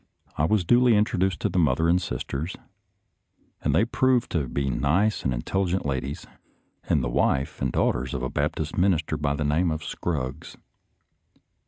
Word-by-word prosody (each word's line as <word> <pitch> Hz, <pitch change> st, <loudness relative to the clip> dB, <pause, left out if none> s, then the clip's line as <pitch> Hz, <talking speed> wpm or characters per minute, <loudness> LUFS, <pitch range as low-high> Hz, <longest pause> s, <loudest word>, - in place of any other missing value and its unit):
I 75 Hz, -, +1 dB
was 100 Hz, 0 st, +1 dB
duly 120 Hz, +3 st, +5 dB
introduced 95 Hz, -4 st, +1 dB
to -, -, +1 dB
the 95 Hz, -, 0 dB
mother 80 Hz, 0 st, +2 dB
and 90 Hz, +2 st, +3 dB
sisters, 80 Hz, -1 st, -4 dB, 1.1 s
and -, -, +1 dB
they 110 Hz, -, +4 dB
proved 125 Hz, +1 st, +1 dB
to 75 Hz, -6 st, 0 dB
be 70 Hz, +2 st, -2 dB
nice 80 Hz, -, +1 dB
and 65 Hz, -, 0 dB
intelligent 90 Hz, +9 st, -1 dB
ladies, 70 Hz, 0 st, -3 dB, 0.6 s
and 70 Hz, -, +1 dB
the -, -, 0 dB
wife 70 Hz, +4 st, 0 dB
and 65 Hz, -2 st, 0 dB
daughters 65 Hz, +2 st, 0 dB
of 65 Hz, -, -3 dB
a 65 Hz, -, -1 dB
Baptist 80 Hz, +1 st, -2 dB
minister 85 Hz, -4 st, +1 dB
by 75 Hz, -2 st, -1 dB
the 75 Hz, 0 st, -2 dB
name 80 Hz, +5 st, +2 dB
of 80 Hz, -1 st, -3 dB
Scruggs. 75 Hz, -2 st, -4 dB
80 Hz, 165 wpm, -25 LUFS, 70-95 Hz, 1.1 s, duly